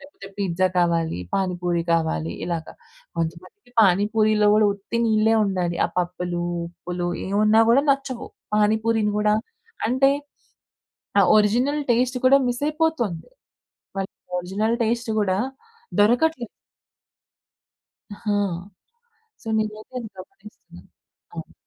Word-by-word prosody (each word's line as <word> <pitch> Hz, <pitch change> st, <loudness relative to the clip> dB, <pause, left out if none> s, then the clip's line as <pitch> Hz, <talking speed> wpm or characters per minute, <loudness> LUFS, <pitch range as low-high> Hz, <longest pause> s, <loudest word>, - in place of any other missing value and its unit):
లేపోతే 280 Hz, -8 st, -13 dB
పిజ్జా 185 Hz, -1 st, +1 dB
కావాలి, 170 Hz, -, +1 dB, 0.2 s
పాని 190 Hz, -2 st, 0 dB
పూరి 175 Hz, -1 st, 0 dB
కావాలి" 120 Hz, -, 0 dB
ఇలాగ. 170 Hz, -2 st, -3 dB, 0.5 s
కొంతమందికి 170 Hz, -, -6 dB
పానీపూరీలో 210 Hz, +2 st, +3 dB
కూడా 215 Hz, 0 st, +4 dB
ఉత్తి 205 Hz, +3 st, -5 dB
నీళ్ళే 220 Hz, 0 st, +3 dB
ఉండాలి. 180 Hz, -3 st, -1 dB
ఆ -, -, -10 dB
పప్పులు 175 Hz, 0 st, -2 dB, 0.2 s
ఉప్పులు 175 Hz, +1 st, -5 dB, 0.2 s
ఏవున్నా 215 Hz, +3 st, +4 dB
గూడా 270 Hz, +4 st, +4 dB
నచ్చవు. 275 Hz, -3 st, -2 dB, 0.3 s
పానీపూరీని 215 Hz, 0 st, +2 dB
గూడా 210 Hz, 0 st, +3 dB, 0.5 s
అంటే 260 Hz, +3 st, +4 dB, 1.1 s
ఆ -, -, +7 dB, 0.2 s
ఒరిజినల్ 245 Hz, +8 st, +2 dB
టేస్ట్ 250 Hz, +2 st, +1 dB
కూడా 275 Hz, +2 st, +7 dB
మిసయిపోతోంది. 290 Hz, -, -1 dB, 0.7 s
వాళ్ళకి 195 Hz, 0 st, -4 dB, 0.2 s
ఆ -, -, -2 dB
ఒరిజినల్ 205 Hz, +6 st, -1 dB
టేస్ట్ 235 Hz, +1 st, -1 dB
గూడా 190 Hz, -2 st, +1 dB, 0.6 s
దొరకట్లేదు. 245 Hz, +4 st, +3 dB, 1.7 s
ఆ! -, -, -15 dB, 1.3 s
సో, 235 Hz, -, -12 dB
నేనైతే 215 Hz, +3 st, -4 dB, 0.2 s
గమనిస్తున్నాను. 185 Hz, -, -14 dB, 0.4 s
అవును. -, -, -8 dB
210 Hz, 105 wpm, -23 LUFS, 180-235 Hz, 1.7 s, ఆ